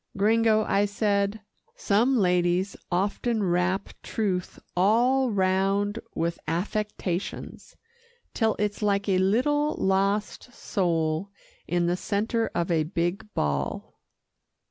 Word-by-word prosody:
"Gringo," 220 +1 +3
I 200 0 +2
said, 205 0 0 0.3
"some 235 +6 +2
ladies 180 0 +1 0.2
often 205 +5 0
wrap 185 +2 0
truth 190 -5 -2 0.2
all 240 +8 +3
round 195 +1 +1 0.2
with 170 +1 -1
affectations, 190 +1 -3 0.6
till 225 -2 +1
it's 210 0 -2
like 200 -1 +1
a 190 -2 +3
little 290 +10 +2
lost 200 +5 0
soul 170 -5 -1 0.4
in 175 -1 +1
the 175 +1 +1
centre 220 +4 -1
of 170 0 0
a 165 -2 +3
big 175 +6 -2
ball." 70 -2 -2
200 Hz, 105 wpm, -26 LUFS, 180-215 Hz, 0.6 s, Gringo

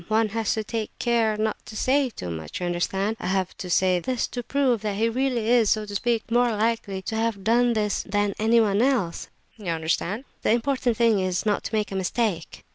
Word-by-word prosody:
One 220 0 +2
has 225 0 -1
to 220 - -2
take 220 0 -3
care 230 -3 +1
not 215 0 -2
to 215 - -9
say 265 +4 +2
too 90 - -6
much, 80 -1 -6
you 180 - -2
understand? 190 +5 -1
I 190 0 0
say 180 0 +2
this 250 +7 -1
to 245 - -4
prove 255 -3 +1
that 210 -2 -2
he 220 +3 +2
really 245 -1 0
is, 235 -3 +4
so 215 -1 +1
to 205 - -8
speak, 230 +2 -1
more 245 +1 +4
likely 210 -3 -1
to 220 - -4
have 220 -3 -1
done 240 +2 +3
this 210 -2 0
than 205 0 0
anyone 220 -2 +3
else, 245 -10 +1 0.3
eh? 210 - -11
You 170 - 0
understand? 170 +7 -1 0.2
The - - +3
important 245 -1 0
thing 230 -3 +4
is, 185 0 -1
not 210 -1 +1
to 220 - -2
make 210 -1 -1
a - - -4
mistake." 190 -2 -2
220 Hz, 210 wpm, -25 LUFS, 195-235 Hz, 0.3 s, is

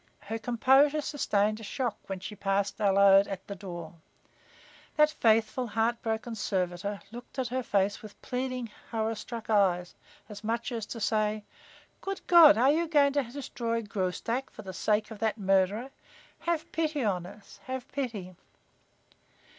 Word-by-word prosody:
Her 225 +2 -5
composure 265 +6 +4
sustained 215 -8 0
a - - -10
shock 240 +1 -2
when 195 -1 -4
she 190 +3 -7
passed 200 +1 -1
Allode 195 -1 +6
at 195 -1 -6
the 200 - -6
door. 175 -5 -8 1.0
That 300 0 +5
faithful, 225 -2 +2
heart 225 +2 0
broken 225 +1 -3
servitor 195 -2 -2
looked 240 +4 -11
at 255 -2 -1
her 255 +1 -1
face 200 -3 0
with 215 -2 -12
pleading, 255 -2 -3 0.2
horror 225 -1 -1
struck 220 0 -7
eyes 185 -5 +2 0.3
as 210 -1 -10
much 230 +3 -2
as 225 -3 -4
to 230 - -6
say: 215 0 0 0.6
"Good 390 0 -5
God, 335 - +8
are 260 +4 +5
you 335 +3 +1
going 285 -3 +4
to 285 - +2
destroy 235 -3 -3
Graustark 205 +6 -2
for 215 - -11
the 190 -1 -7
sake 210 +2 0
of 215 - -8
that 220 +1 0
murderer? 195 +5 +1 0.5
Have 335 -2 -2
pity 310 -4 -1
on 180 -5 -1
us 200 +1 -14
have 260 0 -5
pity!" 220 -10 -4
220 Hz, 155 wpm, -29 LUFS, 200-255 Hz, 1.0 s, God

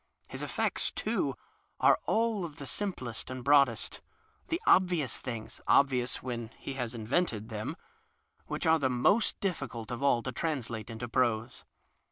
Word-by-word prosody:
His - - -5
effects, - - 0
too, - - -1 0.4
are - - +5
all 225 -3 +1
of 160 -4 -6
the 140 - -8
simplest 130 - -3
and 130 -1 -5
broadest— 140 -5 +3 0.5
^the 330 - +1
obxious 175 -9 +3
things 115 -4 -6
(obvious 125 -3 +3
when 120 -3 -4
he 140 - -6
has 125 -3 -3
invented 115 -1 0
them) 110 -2 -4 0.7
whicli - - -2
arc 160 -1 +4
tiie 130 - +3
most 130 - +3
76 - - -48
CROCK - - -44
difficult 135 - -3
of 120 +2 -4
all 130 -4 +3
to 130 - -3
translate 120 -6 -3
into 115 +1 -5
prose. 115 -2 0
130 Hz, 160 wpm, -31 LUFS, 115-150 Hz, 0.7 s, are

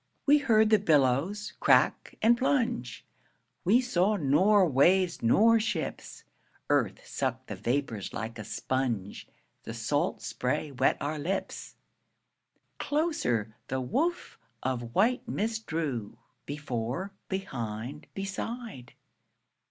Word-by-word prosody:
We 295 +1 +6
heard 220 -5 +3
the 215 - +6
billows 160 +5 +1
crack - - +3
and 235 +2 +6
plunge, 240 - -1 0.6
We 225 +8 +4
saw 210 -4 +1
nor 185 +5 +4
waves 170 +6 +3
nor 225 - +5
ships. 210 -7 -4 0.5
Earth - - +1
sucked - - -3
the - - -6
vapors 120 -5 -2
like 115 +1 -5
a - - -5
sponge, 120 -5 -3 0.3
The - - -7
salt - - -1
spray 150 - -2
wet 130 - +2
our 150 +2 -3
lips. 180 +7 -4 1.0
Closer 120 - 0
the 130 - -2
woof 305 - -2 0.2
of 120 -2 -3
white 235 +6 +2
mist 220 +1 -2
drew, 140 -10 -3 0.3
Before, 145 - -4 0.2
behind, 130 - -5
beside. 195 - -5
165 Hz, 110 wpm, -29 LUFS, -, 1.0 s, We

